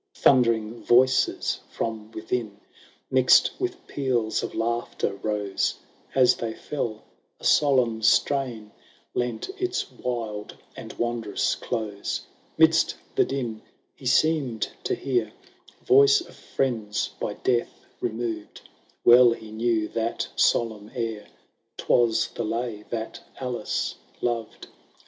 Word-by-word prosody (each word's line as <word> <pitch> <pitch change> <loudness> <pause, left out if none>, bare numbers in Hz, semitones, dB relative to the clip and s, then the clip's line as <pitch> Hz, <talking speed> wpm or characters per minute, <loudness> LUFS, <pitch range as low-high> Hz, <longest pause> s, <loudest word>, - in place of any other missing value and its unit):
Thundering 115 -3 +3
voices 130 +2 +3
from 110 -1 -4
within, 110 -1 -4 0.5
Mixed 130 -1 +6
with 370 -1 -3
peals 125 -6 0
of - - -5
laughter, 115 -3 -1
rose; 105 -2 -1 0.4
As 130 -2 +6
they 115 -1 -4
fell, 115 -7 -4 0.4
a - - -20
solemn 125 -6 +3
strain 115 -2 +1 0.4
Lent 120 - -2
its 370 0 -2
wild 115 -4 -4 0.2
and - - -8
wondrous 120 -3 -1
close! 105 -3 -3 0.4
'Midst - - +4 0.2
the - - +3
din, 120 -5 -3 0.3
he 130 - -7
seemed 135 -5 +2 0.2
to - - +1
hear 120 -5 -1 0.5
Voice 420 +1 +6
of - - -12
friends, 115 -6 -2
by - - -3
death 120 -2 -1
removed 115 -2 -4 0.2
;— - - -36
Well 120 0 +8
he 110 -2 -11
knew 110 -1 0
that 115 0 -2
solemn 110 -3 +1
air, 115 -3 -3 0.5
'Twas 120 -2 +2
the 120 - -4
lay 115 -1 -3
that 115 -1 -4 0.2
Alice 125 -4 -2 0.3
loved. 115 -2 -3
115 Hz, 115 wpm, -25 LUFS, 110-125 Hz, 0.5 s, Well